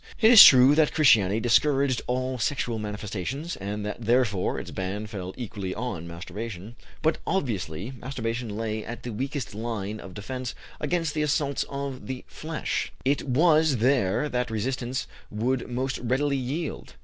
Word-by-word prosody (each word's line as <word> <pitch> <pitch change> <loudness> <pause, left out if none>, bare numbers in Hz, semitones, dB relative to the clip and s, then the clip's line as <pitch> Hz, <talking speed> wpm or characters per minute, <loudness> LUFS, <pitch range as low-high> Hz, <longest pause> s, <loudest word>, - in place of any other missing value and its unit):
It 220 +1 +6
is 225 -5 +12
true 130 +1 +8
that 155 0 +3
Christianity 110 -9 +5
discouraged 135 +2 +2
all 130 0 -1
sexual 120 -3 -1
manifestations, 105 - -4
and 105 +2 -4
that 105 +3 -5
therefore 115 -5 +1
its - - -8
ban 95 +3 -4
fell 95 -4 -6
equally 100 -6 -5
on 105 -8 -4
masturbation, 95 +5 -7 0.3
but, 160 +1 +2
obviously, 105 - -2
masturbation 120 -2 -4
lay 110 -1 -3
at 120 +1 -7
the 120 - -5
weakest 135 0 -4
line 110 -1 -4
of 95 -2 -10
defence 125 +4 -5 0.2
against 160 0 -1
the 155 - -1
assaults 145 -2 0
of 140 -2 -5
the 130 -1 -5
flesh; 160 0 -3
it 140 +2 +2
was 155 +1 +4
there 120 0 +2
that 125 -2 -1
resistance 125 +3 -2 0.2
would 120 +4 -1
most 130 +2 -2
readily 135 +4 0
yield. 140 +5 -4
125 Hz, 150 wpm, -26 LUFS, 105-140 Hz, 0.3 s, is